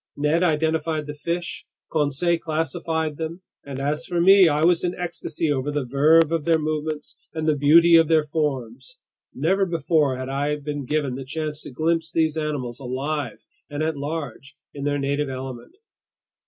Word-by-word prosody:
Ned 150 +3 +2
identified 160 -1 +1
the 150 - -6
fish, 170 +4 -4 0.3
Conseil 160 +3 +1
classified 160 -1 -2
them, 165 +3 -5 0.2
and 140 -2 -7
as 150 +4 -2
for 175 -2 -1
me, 190 +1 +7
I 150 +1 +1
was 170 0 +3
in 180 0 -1
ecstasy 165 -3 -3
over 140 0 -1
the 145 -2 -2
verve 150 +5 +4
of 165 -2 0
their 165 +1 +3
movements 155 -1 -4
and 160 0 -2
the 155 - +3
beauty 165 +4 +6
of 165 -1 +4
their 160 -1 +4
forms. 150 - -3 0.3
Never 185 +8 +1
before 155 -5 +1
had 130 0 -5
I 140 +2 -1
been 145 -1 -5
given 145 -3 0
the 135 +2 -5
chance 150 +2 -4
to - - -9
glimpse 160 +4 0
these 160 -1 +1
animals 145 -6 -3
alive 135 -1 -4 0.2
and 145 +1 -3
at 160 0 -1
large 145 -2 -5 0.2
in 140 -1 -6
their 145 0 +1
native 140 +1 -1
element. 130 - -7
150 Hz, 170 wpm, -23 LUFS, 140-165 Hz, 0.3 s, me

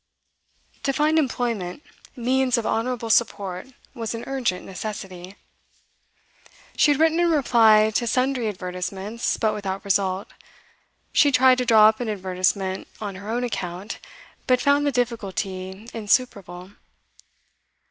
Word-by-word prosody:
To 275 - 0
find 305 +3 +2
employment, 235 - -2 0.3
means 255 0 +1
of 230 - -2
honourable 230 0 -1
support, 200 -4 0 0.3
was 230 -1 -4
an 230 - -6
urgent 250 -9 -2
necessity. 190 -1 -7 1.4
She - - +4
had 290 -1 +2
written 320 +1 +3
in 345 0 +3
reply 225 -8 +5
to 235 +2 -1
sundry 255 0 0
advertisements, 190 +3 -4
but 220 -2 +1
without 195 -1 -4
result. 195 -1 0 0.9
She 290 - +5
tried 255 -1 +5
to 250 - 0
draw 220 -2 +7
up 220 0 +2
an 240 -3 -3
advertisement 190 -1 -1
on 205 -2 -5
her 200 +3 -9
own 240 +2 -1
account, 195 -3 -5 0.5
but 255 -1 +4
found 285 +2 +2
the - - +2
difficulty 200 -4 -3
insuperable. 200 -5 -1
220 Hz, 125 wpm, -23 LUFS, 190-250 Hz, 1.4 s, draw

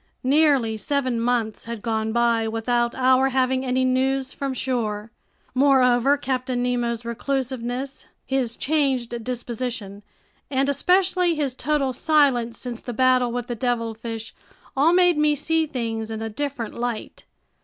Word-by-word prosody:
Nearly 270 -5 +3
seven 255 0 -1
months 235 -2 -1
had 230 -2 -6
gone 220 -1 -1
by 235 -1 +2
without 235 +2 0
our 260 +1 +4
having 260 0 +1
any 255 0 +1
news 265 +1 0
from 275 -2 -3
shore. 225 -4 -2 0.4
Moreover, 265 0 +4
Captain 255 -2 -2
Nemo's 240 -1 -1
reclusiveness, 260 +1 -3 0.2
his 260 -3 -1
changed 260 -6 0
disposition, 235 -4 -4 0.5
and 270 0 +1
especially 360 +3 +2
his 285 -4 -1
total 275 0 0
silence 260 -5 +2
since 245 -2 -6
the 245 - -6
battle 255 0 +3
with 245 0 -3
the 240 - -4
devilfish 230 -2 -3 0.4
all 290 +5 +4
made 355 -3 +4
me 300 0 +3
see 320 +2 0
things 225 -5 -3
in 220 -1 -4
a 225 0 -4
different 265 -1 -4
light. 240 -2 -5
250 Hz, 135 wpm, -23 LUFS, 235-275 Hz, 0.5 s, our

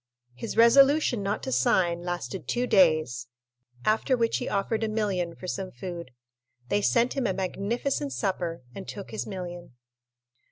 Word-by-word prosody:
His 125 - -6
resolution 270 +1 +5
not 200 +2 -2
to - - -3
sign 170 +8 +2
lasted 175 +2 -4
two 245 +1 0
days, 155 - +3 0.6
after 225 +4 +2
which 230 -1 +1
he 250 - -3
offered 215 +3 -1
a - - +1
million 195 -6 -1
for - - -10
some 185 +1 -3
food. 170 +4 -7 0.6
They 205 - +2
sent 235 +4 +2
him 270 -4 0
a 190 - 0
magnificent 230 +10 -2
supper, 175 - -2
and 195 - -8
took 200 -2 -7
his 220 - -4
million. 175 -5 -7
195 Hz, 155 wpm, -27 LUFS, 175-230 Hz, 0.6 s, resolution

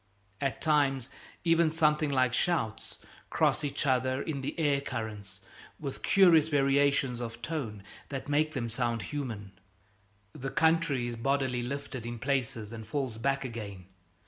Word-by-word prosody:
At 135 -2 -1
times, 140 -5 +2 0.3
even, 165 -1 +4
something 155 -1 +2
like 130 -3 +2
shouts 125 -10 -1 0.3
cross - - +2
each 145 +1 -2
other 130 0 +2
in 140 -1 -3
the 135 - -4
air 145 -3 +2
currents, 110 -7 -6 0.4
with 140 -3 -5
curious 170 -5 +6
variation 140 -3 +2
of 115 -1 -5
tone 115 -9 -4 0.3
that 135 -2 -5
make 155 +2 +1
the 125 -5 -2
sound 115 -2 -1
human. 110 -6 -5 0.8
The 135 +1 -5
country 160 -6 +2
is 120 -1 -3
bodily 130 0 0
lifted 130 -1 -5
in 120 0 -4
places 125 -4 -2
and 110 -2 -8
falls 130 -3 -2
back 135 +2 0
again. 105 -6 -6
135 Hz, 145 wpm, -30 LUFS, 115-145 Hz, 0.8 s, curious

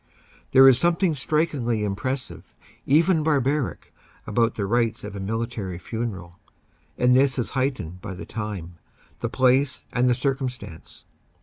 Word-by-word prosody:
There 135 0 +8
is 130 -2 +6
something 170 +1 +2
strikingly 135 -6 0
impressive, 125 +6 -4 0.3
even 160 +4 +4
bar 150 -2 +2
baric, 135 +1 -2 0.3
about 115 -2 +1
the 100 - -2
rites 115 +2 0
of 105 0 -7
a - - -5
military 110 -2 -3
funeral, 95 -4 -6 0.6
and 125 0 +4
this 135 +1 +3
is 125 - -2
height 130 +1 0
ened 90 -3 -8
by 95 - -6
the 85 -2 -8
time, 95 -6 -6 0.4
the - - -2
place 130 +1 +2
and 125 +1 +2
the 125 - +3
circumstance. 125 - -4
125 Hz, 145 wpm, -24 LUFS, 105-135 Hz, 0.6 s, There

